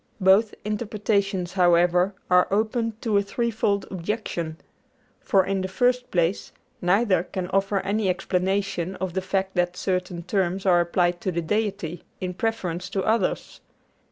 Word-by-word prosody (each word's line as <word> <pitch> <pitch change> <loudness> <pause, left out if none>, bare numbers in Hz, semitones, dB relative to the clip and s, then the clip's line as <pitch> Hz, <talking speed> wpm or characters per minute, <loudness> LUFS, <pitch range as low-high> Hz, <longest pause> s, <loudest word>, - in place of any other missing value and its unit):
Both 195 +3 +4
interpretations, 205 -4 -1
however, 180 +1 +3
are 180 0 +4
open 225 +3 0
to 215 -3 +1
a - - +2
threefold 205 -1 -1
objection. 175 -4 -3 0.6
For, 190 -2 +2
in 195 0 -1
the 185 - -2
first 250 +5 +1
place, 175 +1 0 0.3
neither 185 0 +3
can 180 0 -5
offer 195 0 +1
any 205 0 0
explanation 190 0 -1
of 190 -2 -4
the 190 - -1
fact 190 0 -1
that 175 0 +1
certain 180 -2 -2
terms 190 +1 -1
are 175 -2 +5
applied 175 0 +1
to 185 - -1
the 170 -1 -2
Deity 180 -3 -2 0.2
in 180 -1 -3
preference 180 -4 -2
to 195 - -1
others. 220 -3 -1
190 Hz, 145 wpm, -25 LUFS, 180-205 Hz, 0.6 s, are